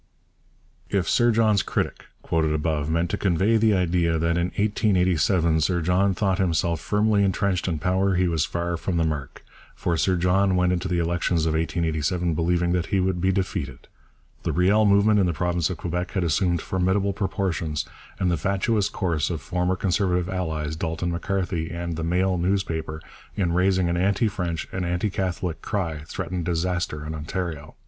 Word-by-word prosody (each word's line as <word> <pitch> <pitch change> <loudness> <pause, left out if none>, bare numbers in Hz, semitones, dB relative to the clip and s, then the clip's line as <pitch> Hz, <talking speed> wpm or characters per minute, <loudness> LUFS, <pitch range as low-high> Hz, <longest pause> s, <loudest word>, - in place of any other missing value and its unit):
If 95 -4 0
Sir 120 -1 +3
John's 110 -3 +3
critic, - - -3 0.2
quoted 80 -2 +1
above, 75 -1 -1
meant 85 +1 0
to - - -2
convey 95 +4 +2
the 110 -1 +3
idea 85 -2 +1
that 85 +1 +1
in 85 0 +1
1887 90 -5 +2
Sir 85 +3 +1
John 90 +3 +2
thought 95 -2 0
himself 85 -2 +1
firmly 105 0 +2
entrenched 95 -1 0
in 85 -3 -1
power, 95 +4 +1
he 90 0 +2
was 80 -3 +1
far 85 +2 -2
from 85 +1 -2
the 85 - +2
mark. 75 -5 -4 0.3
For 85 - -1
Sir 95 +3 +2
John 95 +2 +2
went 90 0 +2
into 90 +1 -2
the 90 -1 -1
elections 85 -1 0
of 80 - +1
1887 80 +1 0
believing 85 +2 +1
that 90 -1 0
he 100 - +1
would 90 -1 0
be 95 +1 +3
defeated. 90 -9 -3 0.5
The - - -1
Riel 100 +5 +3
movement 105 +1 +4
in 95 - +3
the 85 - 0
province 85 -1 0
of 90 - -4
Quebec 90 +2 -3
had 95 -2 0
assumed 85 +1 +1
formidable 95 +2 0
proportions, 95 -6 -2 0.3
and 90 -1 +1
the 85 - +1
fatuous 100 +4 0
course 80 -6 -1
of 85 -3 -3
former 90 +6 -1
Conservative 90 -1 0
allies, 80 -5 -2
Dalton 80 +2 -2
M'Carthy 90 -2 -2
and 85 -1 -4
the 80 - -4
Mail 90 +2 +1
newspaper, 80 -4 -2 0.3
in 90 -4 0
raising 95 0 +2
an 85 0 0
anti 100 +4 +2
French 90 -5 -3
and 95 - -3
anti 90 +4 -1
Catholic 90 -3 -3
cry 85 -7 -2
threatened 90 +1 -4
disaster 85 -3 -2
in 80 - -5
Ontario. 80 -1 -5
90 Hz, 175 wpm, -24 LUFS, 85-95 Hz, 0.5 s, movement